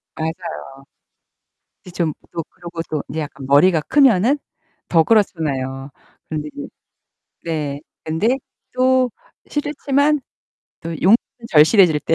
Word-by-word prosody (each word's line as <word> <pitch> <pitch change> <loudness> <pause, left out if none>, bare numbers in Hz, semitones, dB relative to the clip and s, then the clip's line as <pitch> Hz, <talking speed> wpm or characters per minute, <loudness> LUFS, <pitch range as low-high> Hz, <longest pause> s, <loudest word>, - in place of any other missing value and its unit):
맞아요. 160 0 -2 1.5
이제 180 - -12
좀 165 -4 -1 0.2
또 165 -1 -3
그러고 170 -1 -7
또 155 -2 -2
이제 155 - -4
약간 140 -3 -6
머리가 155 +4 +5
크면은 265 - +4 0.5
더 165 -2 +4
그렇잖아요. 140 - 0 0.4
그런데 150 -1 -4
이제 145 - -6 0.8
네. 150 -4 -3 0.2
근데 210 +12 +1 0.3
또 255 0 +3 0.4
싫지만 290 0 +1 0.6
또 165 - -6
용돈은 190 +7 +5 0.3
절실해질 160 +1 +6
때. 165 - +1
165 Hz, 235 characters per minute, -20 LUFS, 150-230 Hz, 1.5 s, 절실해질